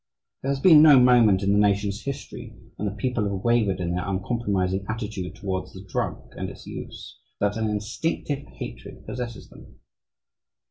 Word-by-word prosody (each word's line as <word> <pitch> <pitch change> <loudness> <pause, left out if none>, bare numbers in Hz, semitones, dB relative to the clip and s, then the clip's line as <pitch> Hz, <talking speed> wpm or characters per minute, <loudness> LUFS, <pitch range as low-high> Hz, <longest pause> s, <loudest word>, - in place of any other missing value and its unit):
There 135 - -3
has 140 -1 0
been 155 0 +8
no 150 -4 +8
moment 120 -6 +5
in 100 - +2
the 105 - +4
nation's 100 +1 +1
history 140 0 -7 0.2
when 105 - -3
the 100 - -8
people 125 -2 -1
have 100 -1 -3
wavered 110 -6 +2
in 85 -1 -2
their 90 +2 -2
uncompromising 95 -2 -1
attitude 105 -5 -4
towards 95 -1 -4
the 95 +1 -10
drug 90 - -3
and - - -4
its - - -12
use, - - -9 0.2
so - - 0
that 100 - -4
an 110 -1 0
instinctive 115 +7 -2
hatred - - -9
possesses 120 -3 -6
them. - - -15
105 Hz, 175 wpm, -25 LUFS, 100-125 Hz, 0.2 s, been